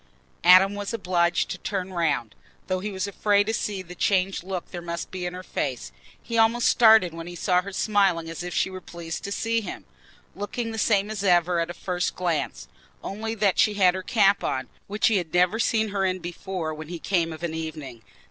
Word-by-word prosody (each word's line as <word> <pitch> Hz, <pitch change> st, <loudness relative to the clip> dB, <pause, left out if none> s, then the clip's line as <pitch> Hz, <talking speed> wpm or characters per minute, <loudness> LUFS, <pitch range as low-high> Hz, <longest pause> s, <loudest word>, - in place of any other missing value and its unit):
Adam 185 Hz, +3 st, +7 dB
was 205 Hz, +2 st, -4 dB
obliged 175 Hz, -4 st, +1 dB
to 180 Hz, -, -5 dB
turn 190 Hz, -2 st, -4 dB
round, 145 Hz, -, 0 dB, 0.3 s
though 185 Hz, -1 st, -1 dB
he 205 Hz, +3 st, -4 dB
was 190 Hz, -1 st, -3 dB
afraid 205 Hz, 0 st, +2 dB
to 220 Hz, -, -1 dB
see 205 Hz, -3 st, -2 dB
the 180 Hz, 0 st, -10 dB
changed 190 Hz, +1 st, +1 dB
look 185 Hz, -1 st, -5 dB
there 175 Hz, -, -6 dB
must 170 Hz, -1 st, -5 dB
be 180 Hz, -1 st, -4 dB
in 175 Hz, -, -6 dB
her 185 Hz, -, -7 dB
face. 130 Hz, -, -3 dB, 0.3 s
He 230 Hz, -1 st, -2 dB
almost 230 Hz, +2 st, +3 dB
started 220 Hz, -7 st, +6 dB
when 165 Hz, 0 st, -7 dB
he 175 Hz, -, -8 dB
saw 180 Hz, +1 st, +2 dB
her 200 Hz, +2 st, -8 dB
smiling 195 Hz, -4 st, +1 dB
as 165 Hz, +1 st, -6 dB
if 175 Hz, 0 st, -5 dB
she 190 Hz, -, 0 dB
were 185 Hz, 0 st, -7 dB
pleased 170 Hz, -2 st, -7 dB
to 200 Hz, -, -5 dB
see 230 Hz, +2 st, 0 dB
him—looking 225 Hz, +2 st, -7 dB
the 225 Hz, -, -4 dB
same 210 Hz, -1 st, +2 dB
as 205 Hz, -2 st, -4 dB
ever 175 Hz, -2 st, +3 dB
at 165 Hz, 0 st, -1 dB
a 175 Hz, -, -6 dB
first 180 Hz, 0 st, -2 dB
glance, 170 Hz, -, -2 dB, 0.4 s
only 220 Hz, +3 st, -4 dB
that 200 Hz, -3 st, +1 dB
she 210 Hz, -1 st, +4 dB
had 185 Hz, -3 st, +4 dB
her 190 Hz, -, -4 dB
cap 200 Hz, -2 st, +3 dB
on, 130 Hz, -1 st, -2 dB, 0.2 s
which 210 Hz, +2 st, -1 dB
he 220 Hz, -, +4 dB
had 170 Hz, -4 st, -3 dB
never 180 Hz, +5 st, +3 dB
seen 220 Hz, -1 st, +1 dB
her 200 Hz, -1 st, -1 dB
in 185 Hz, -1 st, +1 dB
before 175 Hz, -1 st, -5 dB
when 155 Hz, 0 st, -8 dB
he 175 Hz, +1 st, -5 dB
came 170 Hz, -1 st, 0 dB
of 160 Hz, +1 st, -9 dB
an 170 Hz, -2 st, -2 dB
evening. 155 Hz, -7 st, -6 dB
185 Hz, 215 wpm, -25 LUFS, 170-205 Hz, 0.4 s, Adam